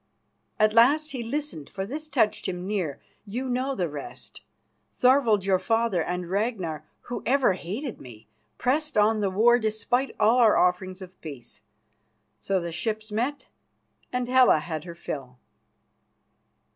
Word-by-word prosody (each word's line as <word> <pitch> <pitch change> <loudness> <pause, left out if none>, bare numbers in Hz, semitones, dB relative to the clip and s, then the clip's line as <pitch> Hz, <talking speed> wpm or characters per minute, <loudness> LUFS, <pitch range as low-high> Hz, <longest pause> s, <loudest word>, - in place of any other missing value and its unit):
At 215 0 +4
last 290 +7 +4
he 255 - -4
listened, 255 - -4
for 190 -1 -4
this 300 +8 -6
touched 240 -8 +1
him 180 -1 -4
near. 185 -8 -2 0.2
You 235 +6 -4
know 255 +2 -1
the 180 -6 0
rest. 145 -2 -8 0.5
Thorvald, 250 -6 +4
your 190 -1 +3
father, 225 -5 +1
and 180 +1 -3
Ragnar, 185 -6 -2 0.2
who 245 - -6
ever 260 -4 +3
hated 210 - -5
me, 115 -4 -13 0.3
pressed 300 +1 0
on 215 +1 +4
the 200 -2 +1
war 235 +6 +4
despite 235 +4 -1
all 225 +4 +4
our 225 -3 +5
offerings 185 +1 +1
of 185 0 -14
peace. 135 -7 -9 0.8
So 195 -1 0
the 170 -1 -5
ships 215 +5 -3
met, 250 +7 -2 0.6
and 250 -1 -1
Hela 255 -7 +6
had 155 0 -5
her 170 -1 -8
fill." 135 -6 -7
215 Hz, 145 wpm, -26 LUFS, 180-250 Hz, 0.8 s, Hela